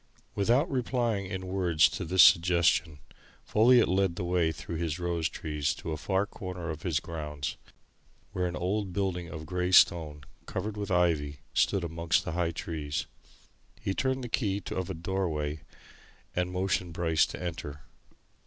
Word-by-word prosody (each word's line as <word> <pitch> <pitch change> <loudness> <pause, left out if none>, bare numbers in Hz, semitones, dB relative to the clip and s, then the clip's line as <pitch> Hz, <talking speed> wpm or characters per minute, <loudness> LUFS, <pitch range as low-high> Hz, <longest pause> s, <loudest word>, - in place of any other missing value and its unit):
Without 120 - +2
replying 120 -6 -1
in 95 0 -5
words 90 -3 +3
to - - -5
this 90 0 +6
suggestion, 85 -2 +4 0.5
Folliot 120 +2 +5
led 95 -1 +1
the 90 - -4
way 85 -2 +1
through 80 +2 -6
his 80 -1 -2
rose 85 -2 -1
trees 75 -1 -2
to 80 - -6
a - - -1
far 95 +6 0
corner 90 -4 -6
of 80 -1 -7
his 80 -3 0
grounds, 75 -5 -5 0.8
where 90 -1 -1
an 90 - -4
old 95 +1 -2
building 95 -3 -1
of 80 -1 -7
grey 90 +2 -1
stone, 80 -5 +4 0.2
covered 105 0 -3
with 105 -1 -4
ivy, 80 -6 +1
stood 100 -3 +2
amongst 85 0 0
high 85 +1 0
trees. 80 -3 -4 0.7
He 95 - -2
turned 130 +3 -1
the - - -4
key 100 -4 -1
of 95 -1 -3
a - - -3
doorway 80 -4 -2 0.7
and 90 0 0
motioned 90 -2 -1
Bryce 80 -2 +2
to - - -8
enter. 80 -4 -5
90 Hz, 155 wpm, -29 LUFS, 80-95 Hz, 0.8 s, this